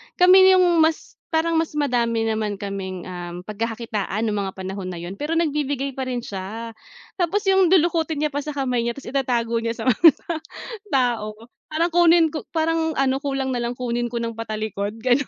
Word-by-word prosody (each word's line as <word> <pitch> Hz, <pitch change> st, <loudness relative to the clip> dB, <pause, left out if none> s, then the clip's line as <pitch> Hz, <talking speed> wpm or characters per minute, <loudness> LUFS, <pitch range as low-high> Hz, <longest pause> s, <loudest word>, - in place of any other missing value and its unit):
Kami 375 Hz, +1 st, +7 dB
yung 350 Hz, -2 st, +4 dB
mas 320 Hz, 0 st, +1 dB
parang 325 Hz, +1 st, +1 dB
mas 325 Hz, -, -1 dB
madami 235 Hz, -4 st, +1 dB
naman 215 Hz, -2 st, -1 dB
kaming, 190 Hz, -2 st, -5 dB
um, 175 Hz, -1 st, -6 dB
pagkakakitaan 220 Hz, -1 st, -3 dB
ng 210 Hz, -, -1 dB
mga 195 Hz, -1 st, -2 dB
panahon 190 Hz, 0 st, -5 dB
na 175 Hz, -, -6 dB
iyon, 175 Hz, +3 st, -6 dB
pero 295 Hz, +9 st, -4 dB
nagbibigay 285 Hz, -4 st, -1 dB
pa 265 Hz, -, -3 dB
rin 250 Hz, -1 st, -2 dB
siya. 220 Hz, +4 st, -6 dB, 0.4 s
Tapos 360 Hz, +2 st, +1 dB
yung 380 Hz, -2 st, +4 dB
lulukutin 325 Hz, -3 st, +2 dB
niya 300 Hz, 0 st, 0 dB
pa 285 Hz, -, -1 dB
sa 300 Hz, -, -4 dB
kamay 250 Hz, -4 st, 0 dB
niya 235 Hz, -, 0 dB
tapos 275 Hz, -3 st, -9 dB
itatago 240 Hz, -4 st, 0 dB
niya 230 Hz, 0 st, -2 dB
sa -, -, -3 dB
mga 260 Hz, +7 st, +7 dB
ta 340 Hz, -, -4 dB, 0.6 s
tao. 235 Hz, -5 st, 0 dB, 0.4 s
Parang 335 Hz, +3 st, +1 dB
kunin 340 Hz, -1 st, +5 dB
ko 310 Hz, -, -5 dB
parang 320 Hz, 0 st, +1 dB
ano 265 Hz, -1 st, +2 dB
kulang 270 Hz, -2 st, -1 dB
na -, -, -1 dB
lang 240 Hz, +1 st, -3 dB
kunin 240 Hz, -1 st, -1 dB
ko 235 Hz, -, -2 dB
nang 230 Hz, -1 st, -4 dB
patalikod, 215 Hz, -2 st, -4 dB
gano'n. 255 Hz, +4 st, +2 dB
245 Hz, 190 wpm, -22 LUFS, 215-320 Hz, 0.6 s, Kami